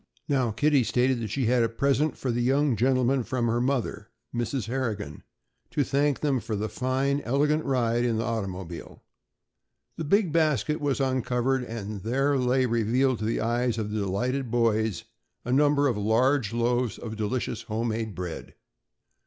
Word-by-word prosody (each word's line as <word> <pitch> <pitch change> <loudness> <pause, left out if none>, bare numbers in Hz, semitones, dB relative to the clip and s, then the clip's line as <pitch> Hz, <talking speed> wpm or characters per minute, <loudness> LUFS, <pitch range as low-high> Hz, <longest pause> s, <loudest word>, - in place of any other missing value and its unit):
Now, 130 -5 +1
Kitty 140 +5 +2
stated 125 +3 +1
that 110 -2 -4
she 130 +5 -1
had 120 +1 +3
a 115 - +3
"prisint 140 +5 +1
for 130 - -2
the 120 +1 -1
young 135 +3 +2
gintlemin" 130 +3 +2
from 125 0 -1
her 120 +1 +1
mother, 120 -5 -2 0.2
Mrs. 120 +1 -2
Harrigan, 110 - -3 0.5
"to 145 - +1
thank 140 +1 +1
thim 140 -4 +1
for 115 -2 -4
the 105 +2 -2
foine 130 +5 0
illigant 145 +5 +1
ride 120 -3 +1
in 120 -2 +1
the 115 - 0
artymobile." 95 -7 -5 1.0
The 165 - -3
big 185 +3 +2
basket 150 -3 +1
was 145 -2 0
uncovered 130 0 0
and 110 -4 -6
there 135 +7 +1
lay 130 +1 +2
revealed 120 +2 +1
to 110 - -3
the 115 - 0
eyes 120 0 0
of 105 -2 -3
the 110 - -1
delighted 120 +7 -1
boys 110 -5 +1 0.4
a 125 - 0
number 145 +1 +4
of 120 -6 0
large 115 +3 +2
loaves 120 0 0
of 110 -2 -6
delicious 110 +4 -2
homemade 110 -1 -3
bread. 90 -2 -6
120 Hz, 165 wpm, -27 LUFS, 110-135 Hz, 1.0 s, number